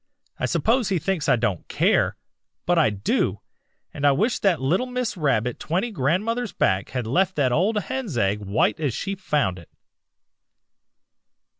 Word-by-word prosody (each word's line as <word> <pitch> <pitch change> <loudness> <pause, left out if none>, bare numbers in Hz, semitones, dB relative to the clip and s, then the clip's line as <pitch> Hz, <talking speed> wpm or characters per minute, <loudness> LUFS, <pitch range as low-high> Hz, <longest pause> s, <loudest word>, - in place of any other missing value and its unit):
I - - 0
suppose 230 -1 +1
he 190 - +1
thinks 170 -1 -1
I - - +6
don't 105 -7 -2
care, - - +2 0.5
but 175 -1 +3
I 155 - +4
do, 100 -1 -1 0.5
and 145 - -7
I 145 - +6
wish 215 - +1
that 190 -5 +2
little 170 - +1
Miss 250 -4 -2
Rabbit 125 - 0
twenty 190 +9 -1
grandmothers 205 - -1
back 95 +1 +1
had 125 -3 -3
left 185 +10 +1
that 135 -4 +2
old 195 - +2
hen's 255 - -4
egg 100 -1 +1
white 105 +7 0
as 145 -7 -1
she 195 - -3
found 150 - -1
it.' 85 - -16
160 Hz, 160 wpm, -24 LUFS, 120-200 Hz, 0.5 s, I